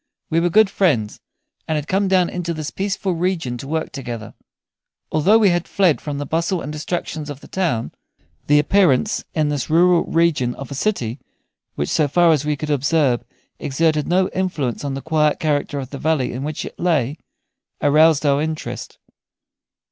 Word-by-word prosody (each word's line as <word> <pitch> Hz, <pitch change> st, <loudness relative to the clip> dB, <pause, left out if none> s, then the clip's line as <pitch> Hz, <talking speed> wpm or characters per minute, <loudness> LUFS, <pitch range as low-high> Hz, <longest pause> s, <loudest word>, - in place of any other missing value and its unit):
We 165 Hz, -, +3 dB
were 175 Hz, +1 st, +2 dB
good 215 Hz, +2 st, +4 dB
friends, 140 Hz, -, +1 dB, 0.5 s
and 160 Hz, -, 0 dB
had 150 Hz, -1 st, -3 dB
come 195 Hz, +1 st, +1 dB
down 185 Hz, -2 st, +3 dB
into 170 Hz, -1 st, -3 dB
this 155 Hz, -1 st, -5 dB
peaceful 195 Hz, -1 st, -2 dB
region 165 Hz, -7 st, -1 dB
to 135 Hz, -, -7 dB
work 160 Hz, +2 st, -2 dB
together. 120 Hz, -5 st, -6 dB, 0.8 s
Although 185 Hz, +8 st, +4 dB
we 215 Hz, -3 st, +4 dB
had 175 Hz, -1 st, 0 dB
fled 185 Hz, -6 st, +2 dB
from 145 Hz, -2 st, -4 dB
the 145 Hz, -, -3 dB
bustle 170 Hz, +5 st, -1 dB
and 150 Hz, -1 st, -6 dB
distractions 155 Hz, -1 st, -4 dB
of 145 Hz, -2 st, -7 dB
the -, -, -14 dB
town, 170 Hz, -12 st, -1 dB, 0.6 s
the 145 Hz, -, +5 dB
appearance 180 Hz, -, +2 dB
in 155 Hz, -2 st, +1 dB
this 145 Hz, -4 st, -2 dB
rural 175 Hz, +2 st, +4 dB
region 160 Hz, -7 st, +1 dB
of 135 Hz, -1 st, -9 dB
a -, -, -3 dB
city, 135 Hz, -, -2 dB, 0.6 s
which, 75 Hz, -, -2 dB
so 155 Hz, -2 st, +2 dB
far 170 Hz, +4 st, +4 dB
as 150 Hz, -3 st, +2 dB
we 150 Hz, 0 st, 0 dB
could 150 Hz, +1 st, -4 dB
observe, 140 Hz, -3 st, +2 dB, 0.4 s
exerted 155 Hz, +1 st, 0 dB
no 185 Hz, +1 st, +2 dB
influence 160 Hz, -10 st, -2 dB
on 140 Hz, -2 st, -3 dB
the 135 Hz, -, -6 dB
quiet 155 Hz, -2 st, +1 dB
character 145 Hz, -1 st, -1 dB
of 135 Hz, -2 st, -5 dB
the 140 Hz, -, -6 dB
valley 150 Hz, -6 st, 0 dB
in 125 Hz, -, -5 dB
which 150 Hz, +1 st, -4 dB
it -, -, -10 dB
lay, 155 Hz, -5 st, 0 dB, 0.6 s
aroused 155 Hz, +1 st, +4 dB
our 140 Hz, 0 st, +3 dB
interest. 155 Hz, 0 st, -5 dB
155 Hz, 180 wpm, -20 LUFS, 140-175 Hz, 0.8 s, the